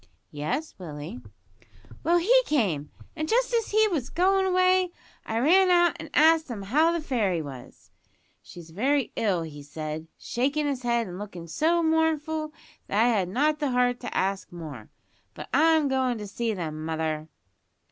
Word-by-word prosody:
"Yes, 155 Hz, -, -3 dB
Willie." 150 Hz, -6 st, -7 dB, 0.8 s
"Well, 340 Hz, +3 st, +3 dB
he 470 Hz, +9 st, +5 dB
came, 180 Hz, -, 0 dB, 0.3 s
and 310 Hz, 0 st, -3 dB
just -, -, +2 dB
as 460 Hz, -2 st, +1 dB
he 435 Hz, +1 st, +4 dB
was 285 Hz, -9 st, -2 dB
goin' 380 Hz, +3 st, +2 dB
away 370 Hz, 0 st, +3 dB, 0.4 s
I 225 Hz, -, -2 dB
ran 365 Hz, +10 st, +5 dB
out 345 Hz, -2 st, +4 dB
an' -, -, -9 dB
asked 320 Hz, 0 st, +5 dB
him 215 Hz, -5 st, -5 dB
how 300 Hz, +11 st, +3 dB
the 340 Hz, -, -1 dB
fairy 220 Hz, -, 0 dB
was. 135 Hz, -5 st, -10 dB, 0.5 s
`She's 160 Hz, +8 st, -12 dB
very 265 Hz, -, 0 dB
ill,' 190 Hz, -7 st, 0 dB
he 150 Hz, -2 st, -9 dB
said, 155 Hz, +2 st, -6 dB
shakin' 280 Hz, +5 st, -1 dB
his 275 Hz, -3 st, -2 dB
head, 235 Hz, -1 st, +1 dB
and 180 Hz, -1 st, -8 dB
lookin' 180 Hz, -5 st, -8 dB
so 330 Hz, -, +1 dB
mournful 315 Hz, -1 st, 0 dB, 0.4 s
that 205 Hz, -, 0 dB
I 235 Hz, +2 st, +5 dB
had 195 Hz, -6 st, +1 dB
not 300 Hz, +9 st, +1 dB
the 295 Hz, -3 st, 0 dB
heart 245 Hz, -1 st, +1 dB
to -, -, -5 dB
ask 195 Hz, +1 st, -1 dB
more. 155 Hz, -10 st, -9 dB, 0.5 s
But -, -, -9 dB
I'm 315 Hz, +1 st, +4 dB
goin' 260 Hz, -2 st, 0 dB
to 210 Hz, -, -6 dB
see 230 Hz, +3 st, -2 dB
them, 155 Hz, -4 st, -5 dB
mother." 160 Hz, -1 st, -2 dB
250 Hz, 165 wpm, -26 LUFS, -, 0.8 s, he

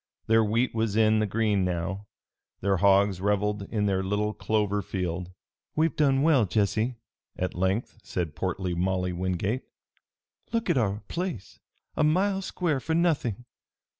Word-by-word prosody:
Their 115 Hz, 0 st, +4 dB
wheat 115 Hz, +4 st, +1 dB
was 110 Hz, -2 st, 0 dB
in 110 Hz, 0 st, +4 dB
the 110 Hz, -, +1 dB
green 105 Hz, -1 st, +1 dB
now. 90 Hz, +3 st, -2 dB, 0.5 s
Their 100 Hz, 0 st, +2 dB
hogs 100 Hz, 0 st, +4 dB
reveled 105 Hz, 0 st, 0 dB
in 105 Hz, -2 st, 0 dB
their 95 Hz, -2 st, +1 dB
little 105 Hz, +2 st, -1 dB
clover 105 Hz, -2 st, 0 dB
field. 90 Hz, -1 st, -3 dB, 0.4 s
"We've 160 Hz, +1 st, +2 dB
done 140 Hz, -2 st, +3 dB
well, 145 Hz, -8 st, +4 dB
Jesse," 110 Hz, +4 st, 0 dB, 0.4 s
at 90 Hz, -, -2 dB
length 95 Hz, +6 st, -1 dB
said 85 Hz, -5 st, -3 dB
portly 90 Hz, +2 st, -2 dB
Molly 90 Hz, +1 st, 0 dB
Wingate. 95 Hz, +7 st, -1 dB, 0.9 s
"Look 230 Hz, -1 st, +1 dB
at -, -, +1 dB
our 105 Hz, -2 st, 0 dB
place! 170 Hz, -, -5 dB, 0.4 s
A -, -, +2 dB
mile 190 Hz, +6 st, +2 dB
square, 175 Hz, -6 st, -1 dB
for 160 Hz, +5 st, -2 dB
nothing! 140 Hz, -, 0 dB
105 Hz, 145 wpm, -27 LUFS, 95-125 Hz, 0.9 s, Their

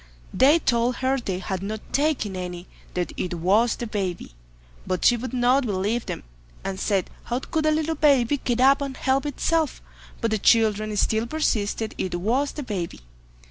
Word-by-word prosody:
They 285 Hz, +5 st, +6 dB
told 240 Hz, -5 st, +1 dB
her 265 Hz, +2 st, 0 dB
they 195 Hz, -6 st, -3 dB
had 190 Hz, 0 st, -4 dB
not 215 Hz, +2 st, -6 dB
taken 275 Hz, -9 st, +1 dB
any—that 180 Hz, 0 st, -6 dB
it 180 Hz, -1 st, -2 dB
was 200 Hz, +8 st, +3 dB
the 240 Hz, -, -5 dB
baby—but 60 Hz, -, -5 dB
she 245 Hz, -, +6 dB
would 245 Hz, +2 st, -5 dB
not 255 Hz, +2 st, +3 dB
believe 210 Hz, +4 st, -1 dB
them, -, -, -5 dB, 0.4 s
and 195 Hz, -1 st, -4 dB
said, 195 Hz, -3 st, 0 dB
"How 240 Hz, -, -1 dB
could 310 Hz, +4 st, -1 dB
a -, -, +4 dB
little 315 Hz, +1 st, 0 dB
baby 285 Hz, -4 st, +3 dB
get 245 Hz, -2 st, -1 dB
up 275 Hz, +2 st, +5 dB
and 275 Hz, -2 st, -4 dB
help 270 Hz, +2 st, +1 dB
itself"; 315 Hz, +2 st, 0 dB, 0.4 s
but 230 Hz, -, -1 dB
the 220 Hz, -, +1 dB
children 215 Hz, -1 st, +3 dB
still 220 Hz, +3 st, +1 dB
persisted 225 Hz, -7 st, -1 dB
it 185 Hz, -, -2 dB
was 240 Hz, +11 st, 0 dB
the 295 Hz, -, -5 dB
baby. 190 Hz, -, -4 dB
230 Hz, 170 wpm, -24 LUFS, 190-270 Hz, 0.4 s, They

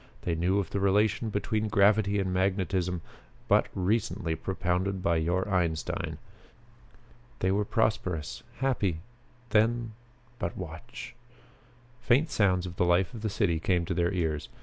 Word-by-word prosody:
They 85 Hz, -, 0 dB
knew 90 Hz, +4 st, +1 dB
of 100 Hz, -, -1 dB
the 100 Hz, -, -1 dB
relation 105 Hz, +3 st, +2 dB
between 105 Hz, +1 st, -1 dB
gravity 105 Hz, 0 st, +4 dB
and 95 Hz, -1 st, -1 dB
magnetism 95 Hz, -2 st, 0 dB, 0.5 s
but -, -, +4 dB
recently 95 Hz, -2 st, 0 dB
propounded 95 Hz, +1 st, -1 dB
by 85 Hz, -1 st, +2 dB
your 90 Hz, +4 st, 0 dB
Einstein. 85 Hz, -5 st, -1 dB, 1.2 s
They 95 Hz, -, +1 dB
were 105 Hz, +1 st, +1 dB
prosperous, 95 Hz, -8 st, -1 dB, 0.2 s
happy. 105 Hz, -11 st, 0 dB, 0.5 s
Then 115 Hz, +1 st, +2 dB, 0.5 s
but 85 Hz, -, -3 dB
watch!" -, -, -8 dB, 0.9 s
Faint 130 Hz, +6 st, +3 dB
sounds 95 Hz, -4 st, +2 dB
of 90 Hz, -1 st, -7 dB
the -, -, +3 dB
life 90 Hz, +5 st, +2 dB
of 115 Hz, -, -7 dB
the 110 Hz, -, -1 dB
city 90 Hz, -5 st, +1 dB
came 90 Hz, 0 st, +1 dB
to -, -, -2 dB
their 85 Hz, -1 st, +1 dB
ears. 80 Hz, -6 st, -1 dB
95 Hz, 140 wpm, -29 LUFS, 90-105 Hz, 1.2 s, gravity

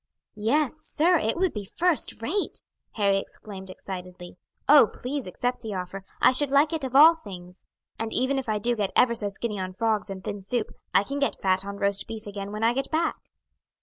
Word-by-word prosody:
"Yes, 260 Hz, +8 st, +1 dB
sir, 325 Hz, +2 st, +2 dB
it 220 Hz, +7 st, -1 dB
would 370 Hz, 0 st, +1 dB
be 210 Hz, -, -4 dB
first 325 Hz, -, 0 dB
rate!" 385 Hz, -, -1 dB, 0.3 s
Harry 200 Hz, -2 st, +2 dB
exclaimed 195 Hz, -1 st, -10 dB
excitedly. 180 Hz, -1 st, -8 dB, 0.3 s
"Oh, 285 Hz, -5 st, +8 dB
please, 270 Hz, -1 st, -4 dB
accept 245 Hz, +7 st, -2 dB
the 220 Hz, -4 st, -5 dB
offer; 185 Hz, +1 st, -5 dB, 0.2 s
I -, -, +6 dB
should 275 Hz, +2 st, -1 dB
like 285 Hz, +3 st, +4 dB
it 320 Hz, -3 st, -2 dB
of 260 Hz, 0 st, -4 dB
all 310 Hz, +4 st, +9 dB
things; 180 Hz, -2 st, -10 dB, 0.4 s
and 225 Hz, 0 st, -3 dB
even 265 Hz, +3 st, +1 dB
if 255 Hz, -, -6 dB
I 215 Hz, -, +1 dB
do 240 Hz, +3 st, 0 dB
get 205 Hz, -3 st, -1 dB
ever 240 Hz, -1 st, +5 dB
so 210 Hz, -3 st, -2 dB
skinny 210 Hz, +1 st, -3 dB
on 185 Hz, 0 st, -4 dB
frogs 215 Hz, -1 st, 0 dB
and 190 Hz, -1 st, -7 dB
thin 200 Hz, -, -5 dB
soup, 215 Hz, +3 st, -2 dB, 0.2 s
I -, -, +4 dB
can 280 Hz, +6 st, -4 dB
get 280 Hz, -, 0 dB
fat 190 Hz, 0 st, +2 dB
on 200 Hz, 0 st, -6 dB
roast 200 Hz, 0 st, 0 dB
beef 220 Hz, -1 st, -7 dB
again 200 Hz, -1 st, -6 dB
when 215 Hz, +1 st, -4 dB
I 230 Hz, +1 st, +4 dB
get 270 Hz, +2 st, -2 dB
back." 320 Hz, +1 st, 0 dB
220 Hz, 210 wpm, -26 LUFS, 195-275 Hz, 0.4 s, all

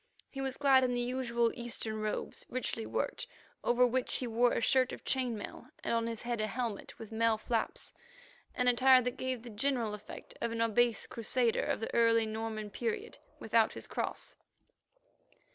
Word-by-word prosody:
He 270 Hz, -, -5 dB
was 265 Hz, -1 st, -1 dB
clad 270 Hz, -2 st, +5 dB
in 250 Hz, -1 st, +1 dB
the -, -, 0 dB
usual 240 Hz, -2 st, 0 dB
Eastern 230 Hz, -2 st, -3 dB
robes, 215 Hz, 0 st, -3 dB
richly 240 Hz, -3 st, -2 dB
worked, -, -, -2 dB, 0.4 s
over 245 Hz, +1 st, +4 dB
which 250 Hz, +1 st, 0 dB
he 255 Hz, -, 0 dB
wore 240 Hz, +1 st, +2 dB
a -, -, +1 dB
shirt 255 Hz, +2 st, +3 dB
of -, -, -9 dB
chain 250 Hz, -4 st, 0 dB
mail, 205 Hz, -, -8 dB, 0.2 s
and -, -, 0 dB
on 230 Hz, 0 st, +1 dB
his 230 Hz, -1 st, -5 dB
head 240 Hz, -2 st, -1 dB
a 215 Hz, -, 0 dB
helmet, 230 Hz, -1 st, -4 dB
with 225 Hz, -1 st, -10 dB
mail 225 Hz, 0 st, +2 dB
flaps, 225 Hz, +1 st, -2 dB, 0.6 s
an 250 Hz, -, +1 dB
attire 255 Hz, +1 st, +6 dB
that 250 Hz, 0 st, -2 dB
gave 255 Hz, -3 st, -3 dB
the 240 Hz, -, -9 dB
general 230 Hz, -1 st, 0 dB
effect 210 Hz, 0 st, -9 dB
of 235 Hz, -, -1 dB
an 230 Hz, -, -3 dB
obese 230 Hz, 0 st, +2 dB
Crusader 235 Hz, 0 st, +1 dB
of -, -, -1 dB
the -, -, -4 dB
early 230 Hz, -1 st, +4 dB
Norman 220 Hz, -1 st, -4 dB
period 445 Hz, -, -3 dB, 0.2 s
without 225 Hz, 0 st, +2 dB
his -, -, -7 dB
cross. -, -, -4 dB
235 Hz, 180 wpm, -32 LUFS, 225-255 Hz, 0.6 s, attire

